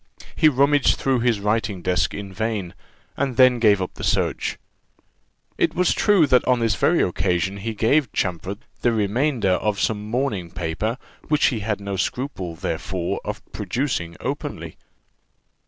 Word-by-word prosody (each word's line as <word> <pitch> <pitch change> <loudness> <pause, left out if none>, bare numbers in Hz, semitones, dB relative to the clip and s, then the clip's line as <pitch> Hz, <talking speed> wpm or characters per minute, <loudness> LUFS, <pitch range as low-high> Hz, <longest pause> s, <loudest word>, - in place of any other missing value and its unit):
He 155 - +5
rummaged 140 +1 +3
through 135 -2 +1
his 120 -3 +1
writing 105 -2 -1
desk 90 +1 +1
in 100 -2 -7
vain, 105 -3 -3 0.4
and 135 -3 -2
then 130 -2 +6
gave 105 -4 +4
up 90 - -6
the - - -9
search. - - 0 1.0
It - - +1
was 180 0 +3
true 205 -7 +4
that 125 -3 +4
on 125 -1 +3
this 115 -2 +2
very 170 +10 +2
occasion 90 +1 0
he 110 +3 -4
gave 125 +4 +2
Champfort 90 +2 -2 0.2
the 120 - +2
remainder 110 +1 +1
of 100 +2 0
some 105 -1 -1
mourning 115 -8 -1
paper, 90 +8 -3 0.3
which 150 -1 +3
he 120 - -3
made 105 -1 -2
no 100 -1 -4
scruple, 95 - -3
therefore, 85 +2 -3
of - - -5
producing 85 - -2
openly. - - -5
110 Hz, 155 wpm, -22 LUFS, 95-130 Hz, 1.0 s, then